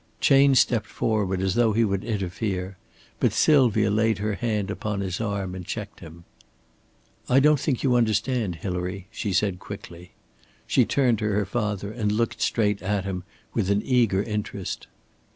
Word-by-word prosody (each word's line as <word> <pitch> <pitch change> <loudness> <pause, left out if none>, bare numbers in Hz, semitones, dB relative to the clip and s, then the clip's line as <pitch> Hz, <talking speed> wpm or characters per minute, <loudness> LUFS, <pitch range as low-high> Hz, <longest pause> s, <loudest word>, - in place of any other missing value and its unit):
Chayne 135 0 +5
stepped 120 -3 +3
forward, 100 -4 -1
as 95 -1 0
though 115 -1 +3
he 115 +2 +3
would 100 -2 -1
interfere, 95 -2 -3 0.4
but - - +3
Sylvia 115 -8 +4
laid 110 0 +2
her 105 +1 -2
hand 105 -3 -2
upon 105 0 -3
his 95 0 -3
arm 100 -4 -2
and 90 -1 -6
checked 105 +2 -6
him. 85 0 -12 1.1
"I 130 - +5
don't 150 +1 +4
think 135 -3 -1
you 130 -3 +3
understand, 115 -3 +1
Hilary," 90 +2 -4
she 105 - -3
said, 95 0 0
quickly. 90 -3 -10 0.5
She - - +3
turned 125 -6 +2
to 110 - -2
her 105 -1 +1
father 105 -1 -2
and 110 -2 -1
looked 115 +2 -1
straight 105 -3 +1
at 100 0 -1
him 90 -2 -4 0.3
with 100 -5 0
an 100 +1 +1
eager 115 -7 +2
interest. 105 -3 -4
105 Hz, 165 wpm, -25 LUFS, 95-115 Hz, 1.1 s, Chayne